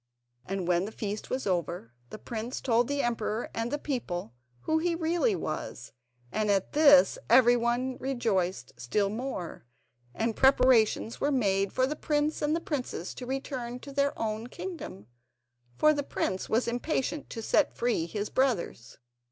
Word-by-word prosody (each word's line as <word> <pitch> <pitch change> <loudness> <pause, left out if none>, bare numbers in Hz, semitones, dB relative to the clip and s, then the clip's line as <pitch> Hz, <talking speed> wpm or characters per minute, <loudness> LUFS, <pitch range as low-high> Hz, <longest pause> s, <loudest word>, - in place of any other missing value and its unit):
And 190 -2 -3
when 175 +1 +2
the 215 - -6
feast 210 -1 -5
was 260 +1 -2
over, 170 - -2 0.2
the - - -7
prince 230 +2 -5
told 235 -1 +2
the 285 0 -1
emperor 230 -1 -2
and 230 +1 -2
the 290 - -1
people 210 - -4 0.3
who 315 0 +1
he 340 +1 0
really 345 +7 +1
was, 155 - -5 0.4
and 215 -1 0
at 195 -2 +1
this 285 -2 +6
everyone 240 +1 +4
rejoiced 200 - -1
still 200 +12 0
more, 210 - -5 0.5
and 225 0 -1
preparations 250 -4 +4
were 290 - +2
made 195 -7 +1
for 255 - +2
the 290 +3 -2
prince 300 0 0
and 310 +3 0
princess 250 - -3
to 250 - -8
return 260 -2 -4
to 280 - -9
their 280 +1 0
own 220 +1 -3
kingdom, 320 - -7 0.7
for 305 0 +5
the 290 - -1
prince 190 -8 -2
was 230 +3 +1
impatient 265 +4 -2
to 225 - -6
set 300 - +3
free 235 -9 0
his 205 +4 -4
brothers. 220 - -1
240 Hz, 155 wpm, -29 LUFS, 205-275 Hz, 0.7 s, this